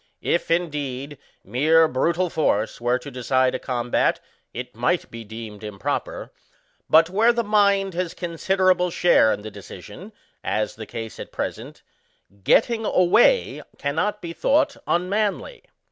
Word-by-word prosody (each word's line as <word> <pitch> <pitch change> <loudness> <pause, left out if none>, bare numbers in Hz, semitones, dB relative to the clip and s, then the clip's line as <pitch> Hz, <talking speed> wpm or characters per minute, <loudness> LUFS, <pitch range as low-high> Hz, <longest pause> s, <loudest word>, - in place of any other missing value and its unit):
If, 170 - 0
indeed, 145 -5 -2 0.2
mere 155 +9 +3
brutal 170 +6 0
force 110 -8 0
were 120 +1 +2
to 140 +3 -10
decide 130 0 +1
a - - -2
combat, 120 -2 0 0.3
it 125 0 -7
might 125 +10 -1
be 115 0 -8
deemed 110 -1 -9
improper; 105 -3 -4 0.6
but, 165 +2 +5
where 220 +5 +4
the 235 0 -1
mind 200 -2 +2
has 175 0 -3
con 175 -1 -5
siderable 185 -1 +2
share 165 -11 +4
in 105 - -3
the 110 - -7
decision, - - -11 0.3
as 110 0 -1
the 110 -1 -9
case 115 -1 -7
at - - -8
present, - - -6 0.6
getting 225 - +3
away 220 - +3 0.2
cannot 160 +10 -2
be 170 -1 -5
thought 275 - +2
unmanly. 205 - -1
160 Hz, 140 wpm, -23 LUFS, 125-185 Hz, 0.6 s, but